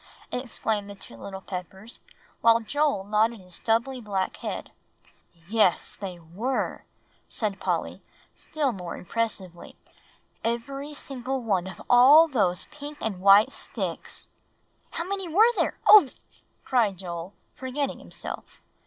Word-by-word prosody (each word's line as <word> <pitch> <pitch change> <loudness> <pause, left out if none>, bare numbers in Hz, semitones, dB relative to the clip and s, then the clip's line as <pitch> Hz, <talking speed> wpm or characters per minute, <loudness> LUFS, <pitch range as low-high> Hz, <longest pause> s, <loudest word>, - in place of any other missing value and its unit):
exclaimed 220 -4 -2
the 200 - -8
two 155 - -12
little 190 - -8
Peppers, 190 +4 -8 0.4
while 230 0 +6
Joel 285 -1 0
nodded 215 +3 +1
his 180 -1 -15
stubbly 235 +6 0
black 195 -4 -2
head. - - -5 0.8
"Yes, 210 -4 +2
they 190 -3 -7
were," 185 +11 -3 0.4
said 205 -3 -2
Polly, - - -2 0.3
still 300 -4 -2
more 180 -5 -6
impressively; 190 -3 -4 0.7
"every 275 +6 -3
single 265 -2 -4
one 190 -5 0
of 190 -2 -9
all 275 +7 +8
those 200 - +1
pink 295 0 -8
and 200 -5 -3
white 200 +7 +7
sticks." - - -4 0.6
"How - - -3
many 385 0 -3
were 440 +8 +6
there - - 0
ugh!" 410 -11 +9 0.6
cried 225 -7 +2
Joel, 175 0 -6 0.2
forgetting 265 +2 -3
himself. - - -8
225 Hz, 125 wpm, -26 LUFS, 190-270 Hz, 0.8 s, ugh